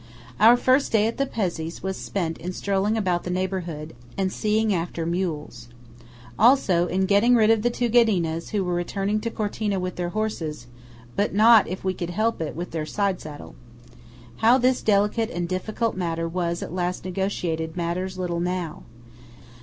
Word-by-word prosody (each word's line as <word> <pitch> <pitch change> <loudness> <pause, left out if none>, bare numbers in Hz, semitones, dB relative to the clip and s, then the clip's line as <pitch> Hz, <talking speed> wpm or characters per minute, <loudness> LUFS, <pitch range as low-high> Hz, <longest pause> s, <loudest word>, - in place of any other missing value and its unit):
Our 230 +3 +7
first 260 +3 +2
day 215 -1 +3
at 230 - -2
the 275 +1 0
Pezzé's 170 -9 -3
was 190 0 -2
spent 170 -5 -3
in 180 +2 -5
strolling 200 +3 0
about 180 -5 0
the - - -5
neighbourhood, 180 -4 -3 0.2
and 190 -1 0
seeing 215 0 +1
after 170 -1 -2
mules. 160 -9 -3 0.7
Also 205 -7 +4
in 190 +2 0
getting 210 +5 +4
rid 220 -1 +5
of 225 -1 +3
the 240 - +2
two 240 0 -1
Ghedinas, 190 -9 +2
who 205 -2 0
were 180 -1 -2
returning 195 +4 -1
to 230 +2 -3
Cortina 210 -2 -2
with 180 -1 -4
their 175 -1 -2
horses, 175 - -3 0.5
but 205 0 0
not, 220 +1 +7
if 185 +3 -5
we 190 0 0
could 175 -1 -5
help 215 +3 0
it, 155 - -3
with 175 +3 -5
their 160 -2 -2
side 195 +3 -1
saddle. 150 -1 -9 0.8
How 235 +3 +5
this 255 0 +2
delicate 210 +2 +2
and 175 0 -3
difficult 215 +5 -2
matter 165 -2 -2
was 170 0 -2
at - - -7
last 180 0 -2
negotiated 175 -4 -2
matters 180 +2 -2
little 175 -2 -2
now. 175 -2 -3
185 Hz, 175 wpm, -24 LUFS, 170-215 Hz, 0.8 s, Our